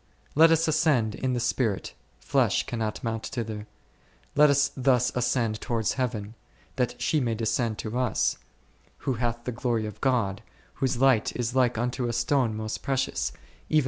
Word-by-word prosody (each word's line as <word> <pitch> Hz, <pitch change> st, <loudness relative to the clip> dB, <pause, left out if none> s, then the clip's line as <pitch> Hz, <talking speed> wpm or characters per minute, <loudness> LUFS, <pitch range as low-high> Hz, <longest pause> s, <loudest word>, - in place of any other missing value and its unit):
Let 160 Hz, +3 st, +7 dB
us 165 Hz, 0 st, +3 dB
ascend 145 Hz, -8 st, +2 dB
in 130 Hz, +2 st, -2 dB
the 120 Hz, -, 0 dB
spirit, 115 Hz, -4 st, -1 dB, 0.2 s
flesh -, -, +1 dB
cannot 110 Hz, -3 st, -3 dB
mount 115 Hz, -1 st, -2 dB
thither. 110 Hz, -4 st, -5 dB, 0.7 s
Let 150 Hz, 0 st, +6 dB
us 140 Hz, 0 st, +3 dB
thus 125 Hz, -2 st, +2 dB
ascend 120 Hz, -3 st, 0 dB
towards 115 Hz, -4 st, 0 dB
Heaven, 115 Hz, -5 st, -3 dB, 0.4 s
that 125 Hz, -1 st, -1 dB
she 150 Hz, +5 st, +1 dB
may 120 Hz, -4 st, 0 dB
descend 110 Hz, 0 st, 0 dB
to 110 Hz, +1 st, -5 dB
us, -, -, +1 dB, 0.7 s
who 135 Hz, -, +1 dB
hath 120 Hz, -1 st, -1 dB
the 125 Hz, -, -3 dB
glory 120 Hz, -2 st, -1 dB
of 105 Hz, -2 st, -8 dB
God, 115 Hz, -8 st, +1 dB, 0.3 s
whose 130 Hz, -2 st, -1 dB
light 130 Hz, -4 st, +3 dB
is 120 Hz, -1 st, -2 dB
like 125 Hz, -3 st, +2 dB
unto 125 Hz, +1 st, -1 dB
a 120 Hz, -, -2 dB
stone 120 Hz, -1 st, +1 dB
most 110 Hz, 0 st, -4 dB
precious, 130 Hz, -, -1 dB
even -, -, -19 dB
like -, -, -24 dB
r -, -, -28 dB
Cant. 155 Hz, -, +7 dB
120 Hz, 175 wpm, -27 LUFS, 110-130 Hz, 0.7 s, Let